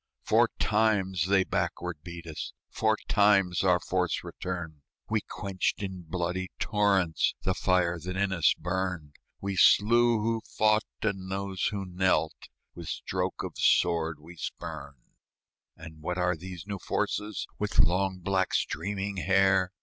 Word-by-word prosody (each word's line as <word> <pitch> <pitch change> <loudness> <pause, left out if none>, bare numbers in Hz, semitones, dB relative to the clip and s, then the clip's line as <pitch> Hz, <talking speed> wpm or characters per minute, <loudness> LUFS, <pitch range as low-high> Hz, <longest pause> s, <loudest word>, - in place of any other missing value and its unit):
Four - - +4
times 100 -5 +1
they 95 -1 +4
backward 90 -3 -2
beat 85 0 -9
us, 80 -2 -6 0.2
Four 110 -1 +1
times 100 -4 +3
our 90 -2 +4
force 90 0 -1
returned; 85 -5 -6 0.3
We 110 -1 0
quenched 100 0 -3
in 95 -2 -5
bloody 90 +2 -2
torrents 100 -7 +1
The 95 - +1
fire 90 -2 +1
that 90 +3 -5
in 100 0 +1
us 85 -5 +3
burned; 90 -4 -3 0.2
We 100 0 -2
slew 115 +5 +5
who 115 +1 0 0.2
fought, 105 0 +4 0.2
and 95 -3 -2
those 95 -1 -2
who 100 -2 -2
knelt 90 -4 0 0.2
With 85 -2 -9
stroke 80 - -3
of - - -7
sword 85 -2 +2
we 85 +3 -13
spurned. 70 -4 -7 0.7
And 80 -1 -11
what 90 +3 -3
are 90 -1 +1
these 90 +2 -8
new 100 -1 -5
forces, 105 +4 -2
With 105 -1 -2
long, 95 +2 +3
black, 95 0 0
streaming 100 0 -2
hair? 95 0 +3
95 Hz, 140 wpm, -28 LUFS, 85-100 Hz, 0.7 s, slew